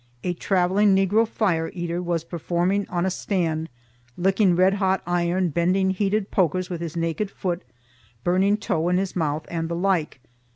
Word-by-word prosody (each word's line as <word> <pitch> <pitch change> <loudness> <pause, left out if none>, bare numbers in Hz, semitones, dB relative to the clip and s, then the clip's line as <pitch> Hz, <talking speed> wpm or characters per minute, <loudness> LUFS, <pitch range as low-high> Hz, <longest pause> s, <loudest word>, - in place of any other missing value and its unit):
A 180 - 0
travelling 190 +3 +2
Negro 200 +4 +3
fire 175 -8 0
eater 175 0 -3
was 170 -2 -1
performing 175 +4 -1
on 175 0 -1
a 190 - 0
stand, 165 -4 -1 0.5
licking 190 0 +3
red 185 +2 +4
hot 190 -2 0
iron, 175 +1 +1
bending 185 +4 +1
heated 200 +2 -1
pokers 185 -1 +1
with 170 -2 -4
his 170 -1 -5
naked 165 +5 -1
foot, 180 -2 -3 0.6
burning 190 +4 +2
tow 175 -5 -1
in 180 - +2
his 190 0 -2
mouth, 155 -3 -1
and 165 -1 -3
the 170 - -2
like. 175 -6 0
180 Hz, 165 wpm, -24 LUFS, 170-195 Hz, 0.6 s, red